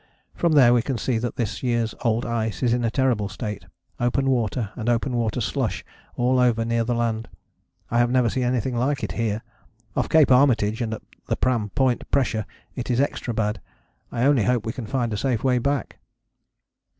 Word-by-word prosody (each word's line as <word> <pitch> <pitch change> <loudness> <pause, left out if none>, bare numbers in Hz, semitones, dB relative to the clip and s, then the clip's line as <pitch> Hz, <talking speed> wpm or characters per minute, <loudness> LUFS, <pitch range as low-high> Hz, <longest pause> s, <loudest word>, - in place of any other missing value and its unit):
From 170 -2 +1
there 130 -5 +7
we 120 - +4
can 130 +1 -2
see 120 -1 0
that 120 +1 -3
this 115 -3 -3
year's 120 -3 0
old 115 0 +1
ice 110 0 -2
is 120 -2 +3
in 120 0 0
a 115 - +2
terrible 120 -5 +1
state, 105 +1 -5 0.3
open 135 +3 +1
water 115 -3 -1
and 120 -1 -2
open 120 +2 0
water 115 0 0
slush 115 -3 -2 0.3
all 125 +1 +2
over 115 -2 +2
near 115 0 +1
the 120 +1 -1
land 115 -1 -1 0.6
I 120 - +2
have 120 0 +3
never 125 -1 +3
seen 130 +3 -1
anything 125 0 0
like 135 +4 0
it - - -2
here. 110 -1 -2 0.5
Off - - 0
Cape 155 -4 +5
Armitage 120 -4 +4
and 110 -1 -1
at - - -12 0.2
the - - 0
Pram 115 -4 0
Point 130 +1 0
pressure 115 -6 0 0.3
it 125 -1 -5
is 125 0 +1
extra 135 -3 -1
bad. 105 -3 -1 0.5
I 120 - -1
only 135 -5 +4
hope 125 -3 +1
we 110 - -2
can 120 -4 -6
find 120 -3 -1
a - - -2
safe 125 -1 -1
way 125 -2 +3
back." 140 -1 -2
120 Hz, 200 wpm, -24 LUFS, 110-130 Hz, 0.6 s, there